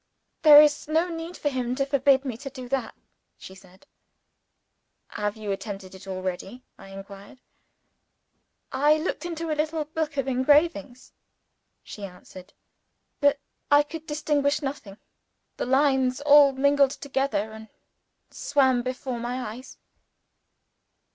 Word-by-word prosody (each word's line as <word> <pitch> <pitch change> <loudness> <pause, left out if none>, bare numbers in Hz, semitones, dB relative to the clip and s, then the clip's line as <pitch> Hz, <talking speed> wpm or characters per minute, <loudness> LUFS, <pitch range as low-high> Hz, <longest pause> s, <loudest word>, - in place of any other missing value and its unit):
"There 300 -2 +9
is 295 -1 0
no 325 +3 +1
need 330 +1 -7
for 290 - -1
him 250 -2 -2
to 275 +1 0
forbid 275 0 +2
me 255 -4 -3
to 275 +2 -8
do 255 -2 -9
that," 260 -4 -2 0.4
she 190 - -12
said. 190 0 -19 1.2
"Have 210 +1 -3
you 210 -2 -4
attempted 195 -1 -6
it 190 +1 -13
already?" 190 +5 -5
I - - -14
inquired. 195 +3 -11 1.3
"I 295 +3 +3
looked 335 +2 -4
into 330 -1 -4
a - - +2
little 310 +1 -2
book 310 -1 -4
of 275 -1 -1
engravings," 260 - +1 0.7
she 210 - -10
answered. 185 0 -11 0.7
"But 285 0 +3 0.3
I 290 0 +6
could 320 +1 -9
distinguish 295 -1 0
nothing. 270 -8 -6 0.6
The - - -3
lines 265 -1 +2
all 290 -1 +7
mingled 280 +1 +3
together 270 -6 -2
and 220 0 -11 0.6
swam 265 -4 +1
before 255 0 -4
my 240 -2 -4
eyes." 255 +3 -12
265 Hz, 130 wpm, -25 LUFS, 220-290 Hz, 1.3 s, There